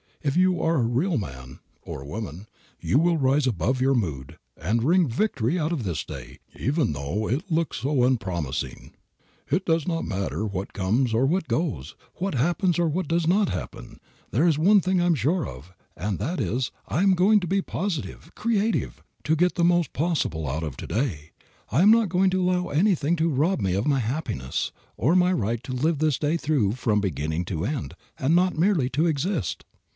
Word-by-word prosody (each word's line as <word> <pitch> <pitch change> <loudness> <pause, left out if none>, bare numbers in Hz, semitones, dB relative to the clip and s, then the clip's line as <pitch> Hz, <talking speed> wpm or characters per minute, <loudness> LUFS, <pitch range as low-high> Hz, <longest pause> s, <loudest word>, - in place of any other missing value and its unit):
If 140 -2 0
you 185 0 +3
are 165 +1 +2
a 125 - +2
real 135 +9 +1
man 65 - -7 0.2
(or 70 - -7
woman) 95 +4 -6 0.3
you - - +1
will 170 +2 +3
rise 135 0 +2
above 125 +3 0
your 135 +1 +3
mood 80 - -3 0.2
and 110 +8 0
wring 170 +4 +4
victory 140 - 0
out 155 +1 -1
of 155 -8 -2
this 85 -6 -2
day, - - -9 0.2
even 135 - 0
though 75 +10 -3
it 160 - -2
looks 165 0 0
so 135 -1 +1
unpromising. 85 - -2 0.6
"It 185 - 0
does 165 -1 +1
not 165 -2 -1
matter 100 +2 -2
what 100 -2 -4
comes 110 +6 +1
or 120 +4 +3
what 170 +5 0
goes, 85 - -2 0.2
what 195 0 -2
happens 175 +6 +1
or 170 - +3
what 165 +2 -1
does 165 +1 +1
not 195 +2 +3
happen, - - -6 0.3
there 150 +10 +3
is 160 -4 +3
one 200 +7 +5
thing 185 0 +1
I - - +2
am 175 -2 +3
sure 155 - 0
of, 70 +8 -10 0.2
and 95 +3 -2
that 155 - -3
is, 125 +1 -1 0.2
I 175 - 0
am 195 -1 +5
going 195 +4 +4
to 180 - -4
be 195 +3 +1
positive, 175 -4 -4
creative, 225 -1 -1 0.2
to 155 - +2
get 175 +3 +2
the 175 - 0
most 175 -1 +2
possible 140 - -1
out 75 +4 -2
of 75 -5 -5
to - - -7
day; 90 - -2 0.4
I 135 - +3
am 205 +3 +7
not 225 -3 +4
going 185 +2 +3
to 185 0 +1
allow 180 0 +1
anything 170 -1 +2
to 165 +1 +2
rob 155 +6 +1
me 95 -4 0
of 100 +7 0
my 140 -2 +3
happiness, 110 - -2 0.3
or 140 +9 +2
of 185 - +5
my 180 +1 +3
right 115 - -1
to 130 - -5
live 150 +5 +1
this 155 -3 +2
day 155 +2 0
through 140 -11 +1
from 110 -4 0
beginning 80 -2 -2
to 85 0 -3
end, 105 - -3 0.2
and 145 +6 +2
not 180 -1 +2
merely 165 -7 +2
to 150 +6 +1
exist. 160 - -1
145 Hz, 200 wpm, -25 LUFS, 105-175 Hz, 0.6 s, am